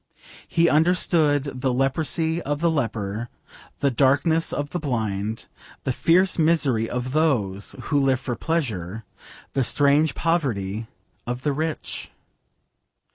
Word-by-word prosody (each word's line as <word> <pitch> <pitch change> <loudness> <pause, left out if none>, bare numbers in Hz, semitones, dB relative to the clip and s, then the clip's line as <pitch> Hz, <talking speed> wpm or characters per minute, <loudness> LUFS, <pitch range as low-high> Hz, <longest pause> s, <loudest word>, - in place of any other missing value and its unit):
He 170 0 +3
understood 150 -4 +2
the 130 -1 +1
leprosy 160 +5 0
of 145 0 -2
the 170 +1 +2
leper, 115 -5 -2 0.5
the 140 - +3
darkness 140 +6 +2
of 145 0 -3
the 175 - -2
blind, 110 -6 -2 0.4
the 130 - 0
fierce 180 +8 +3
misery 145 -9 +2
of 125 +1 -3
those 120 -11 0
who 145 - +1
live 135 -2 +2
for 130 -2 -3
pleasure, 115 - -2 0.5
the 135 - +1
strange 145 +4 +3
poverty 115 - -1 0.4
of 125 +1 -4
the 145 - +1
rich. 155 +2 -4
140 Hz, 125 wpm, -24 LUFS, 120-160 Hz, 0.5 s, He